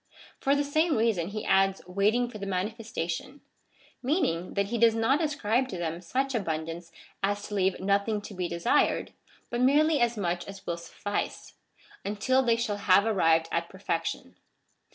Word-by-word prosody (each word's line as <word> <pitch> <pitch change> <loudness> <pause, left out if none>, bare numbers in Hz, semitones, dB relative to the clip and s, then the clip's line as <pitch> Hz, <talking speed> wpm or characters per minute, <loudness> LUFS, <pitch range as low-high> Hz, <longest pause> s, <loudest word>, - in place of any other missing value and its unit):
For 275 +1 +2
the 285 - +1
same 310 +2 +1
reason 220 -7 +1
he 215 +2 -5
adds: 195 0 +3
waiting 205 +7 +1
for 220 -3 -9
the 200 - -5
manifestation, 210 - -3 0.6
meaning, 250 - 0
that 200 0 0
he 235 0 -1
does 230 -1 +5
not 260 +7 +2
ascribe 260 -4 +1
to 190 - -6
them 170 0 -3
such 265 +10 -1
abundance 165 -4 -3 0.3
as 205 +1 0
to 210 - -7
leave 190 -2 +1
nothing 200 +3 +1
to 205 - -9
be 180 -2 -2
desired; 170 +7 +1 0.4
but 240 +1 -1
merely 295 +4 +4
as 235 -1 +2
much 175 -3 -2
as 195 -1 -10
will 170 - -2
suffice, 205 +4 -4 0.5
until 215 +6 +1
they 235 -3 +3
shall 220 -3 -2
have 200 0 +4
arrived 165 -7 +3
at 170 0 -1
perfection. 165 - -4
205 Hz, 165 wpm, -28 LUFS, 180-240 Hz, 0.6 s, does